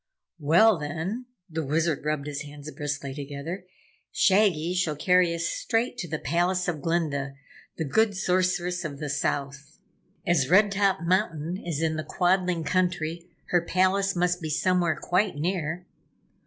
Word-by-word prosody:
"Well 170 Hz, +7 st, +5 dB
then," 165 Hz, +12 st, -4 dB, 0.2 s
the 160 Hz, -2 st, -3 dB
Wizard 155 Hz, +1 st, 0 dB
rubbed 150 Hz, -2 st, -1 dB
his 145 Hz, -1 st, -4 dB
hands 145 Hz, +1 st, -9 dB
briskly 145 Hz, -3 st, -4 dB
together, 145 Hz, +6 st, -6 dB, 0.4 s
"Shaggy 185 Hz, -4 st, +3 dB
shall 175 Hz, -4 st, 0 dB
carry 180 Hz, +3 st, +3 dB
us 165 Hz, 0 st, -2 dB
straight 235 Hz, +6 st, -1 dB
to 175 Hz, -, -3 dB
the 160 Hz, 0 st, -2 dB
Palace 175 Hz, +6 st, 0 dB
of 160 Hz, -4 st, -2 dB
Glinda, 140 Hz, -4 st, -1 dB, 0.4 s
the 160 Hz, -, -1 dB
Good 205 Hz, +7 st, +2 dB
Sorceress 180 Hz, -1 st, 0 dB
of 145 Hz, -3 st, -5 dB
the 150 Hz, 0 st, -5 dB
South. 140 Hz, +1 st, -3 dB, 0.5 s
As 165 Hz, -7 st, +2 dB
Red 200 Hz, +3 st, +5 dB
Top 195 Hz, -3 st, +2 dB
Mountain 175 Hz, -2 st, 0 dB
is 165 Hz, -2 st, -2 dB
in 160 Hz, -1 st, 0 dB
the 155 Hz, -, -2 dB
Quadling 180 Hz, -1 st, +1 dB
Country, 175 Hz, -1 st, -1 dB, 0.2 s
her 175 Hz, -, +4 dB
palace 190 Hz, +3 st, +1 dB
must 180 Hz, 0 st, +1 dB
be 160 Hz, -, -4 dB
somewhere 175 Hz, +1 st, +1 dB
quite 185 Hz, +1 st, +1 dB
near." 170 Hz, +2 st, -2 dB
170 Hz, 150 wpm, -26 LUFS, 150-185 Hz, 0.5 s, Well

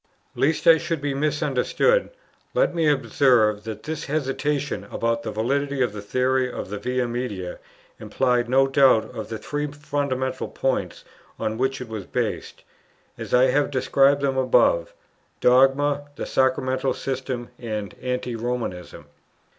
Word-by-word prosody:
Lest 155 Hz, +3 st, +1 dB
I 165 Hz, -1 st, +7 dB
should 165 Hz, 0 st, -2 dB
be 140 Hz, 0 st, -2 dB
misunderstood, 150 Hz, -, +1 dB, 0.5 s
let -, -, +2 dB
me 165 Hz, -3 st, +2 dB
observe 125 Hz, -7 st, +2 dB
that 110 Hz, -1 st, -6 dB
this 155 Hz, +2 st, -4 dB
hesitation 145 Hz, -3 st, -2 dB
about 115 Hz, 0 st, -1 dB
the -, -, -5 dB
validity 135 Hz, +5 st, 0 dB
of 120 Hz, -, -1 dB
the 105 Hz, -, -6 dB
theory 130 Hz, +4 st, 0 dB
of 95 Hz, -, -6 dB
the 105 Hz, -, -4 dB
Via 125 Hz, +3 st, -1 dB
Media 115 Hz, -7 st, -4 dB, 0.4 s
implied 120 Hz, +2 st, 0 dB
no 135 Hz, +2 st, +4 dB
doubt 135 Hz, -5 st, +3 dB
of 110 Hz, -1 st, -6 dB
the 110 Hz, -, -4 dB
three 145 Hz, +7 st, -3 dB
fundamental 140 Hz, -3 st, -3 dB
points 135 Hz, -1 st, -2 dB, 0.3 s
on 110 Hz, -, -2 dB
which 130 Hz, +3 st, -1 dB
it 125 Hz, -, -6 dB
was 110 Hz, -4 st, -7 dB
based, -, -, -3 dB, 0.5 s
as -, -, -8 dB
I 125 Hz, +1 st, +5 dB
have 145 Hz, +2 st, +2 dB
described 140 Hz, +1 st, +3 dB
them 135 Hz, -1 st, +1 dB
above, -, -, +3 dB, 0.5 s
dogma, 135 Hz, +3 st, +3 dB
the -, -, -4 dB
sacramental 130 Hz, 0 st, +1 dB
system, 130 Hz, -2 st, -4 dB
and 105 Hz, -4 st, -4 dB
anti 125 Hz, -1 st, -3 dB
Romanism. 115 Hz, -10 st, -4 dB
130 Hz, 145 wpm, -23 LUFS, 115-140 Hz, 0.5 s, I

